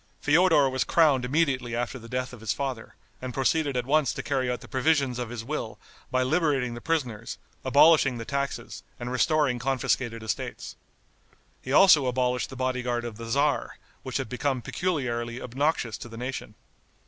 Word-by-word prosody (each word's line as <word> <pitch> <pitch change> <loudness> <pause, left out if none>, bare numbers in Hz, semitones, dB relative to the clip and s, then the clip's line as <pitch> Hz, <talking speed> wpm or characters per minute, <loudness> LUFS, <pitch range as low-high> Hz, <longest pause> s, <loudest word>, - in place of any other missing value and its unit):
Feodor 160 -2 +4
was 130 0 0
crowned 145 -7 +3
immediately 130 -4 0
after 120 +2 -3
the 115 0 -12
death 125 +1 -3
of 125 - -10
his 110 -1 -1
father, 130 -5 -5 0.3
and 130 -1 -6
proceeded 140 0 +1
at 125 - -1
once 150 +1 +2
to - - -4
carry 130 -3 0
out 125 - -2
the - - -11
provisions 135 -2 +1
of 120 -2 -3
his 120 -2 -6
will 120 -4 -4 0.3
by 130 0 +1
liberating 140 -4 +1
the 120 - -8
prisoners, 125 -9 -2 0.3
abolishing 140 -1 +5
the 115 - -6
taxes 140 +2 -3 0.2
and 120 0 -4
restoring 140 -1 +2
confiscated 120 -2 -1
estates. 110 - -4 0.9
He 130 - -6
also 150 -3 +6
abolished 125 0 0
the 130 - -9
body 130 0 -1
guard 120 -1 -2
of 115 -3 -6
the 115 - -7
tzar, 140 +5 0 0.2
which - - -3
had - - -3
become 125 +1 -2
peculiarly 120 -9 -2
obnoxious 125 -3 -1
to 120 - -8
the 115 - -10
nation. 125 -3 -5
130 Hz, 175 wpm, -27 LUFS, 120-145 Hz, 0.9 s, also